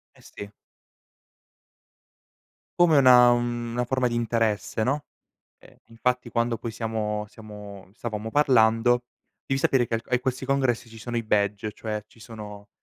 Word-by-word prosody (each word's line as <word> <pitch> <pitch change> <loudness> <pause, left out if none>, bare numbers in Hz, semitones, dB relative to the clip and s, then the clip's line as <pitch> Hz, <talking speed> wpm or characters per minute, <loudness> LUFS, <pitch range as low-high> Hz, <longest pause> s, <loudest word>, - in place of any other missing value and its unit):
Eh, - - -20
sì. 100 0 -10 2.3
Come 170 -3 +6
una 125 -3 +7
una 120 0 -1
forma 130 0 0
di 120 - -4
interesse, 115 -2 0
no, 145 +4 -1 0.5
ehm, - - -19
infatti 125 +2 -2
quando 115 0 0
poi 115 0 -5
siamo 110 -2 -3
siamo 105 -3 -11
stavamo 110 -1 -5
parlando 120 -3 +3 0.4
devi 135 - -1
sapere 130 -3 +2
che - - -2
al 115 - -2
e 125 - +1
questi 130 +1 -3
congressi 130 -3 0
ci 115 0 -13
sono 120 +2 -5
i 115 - -1
badge, 105 0 0
cioè 105 0 -5
ci 115 - -22
sono, 105 -3 -10
115 Hz, 145 wpm, -25 LUFS, 110-125 Hz, 2.3 s, una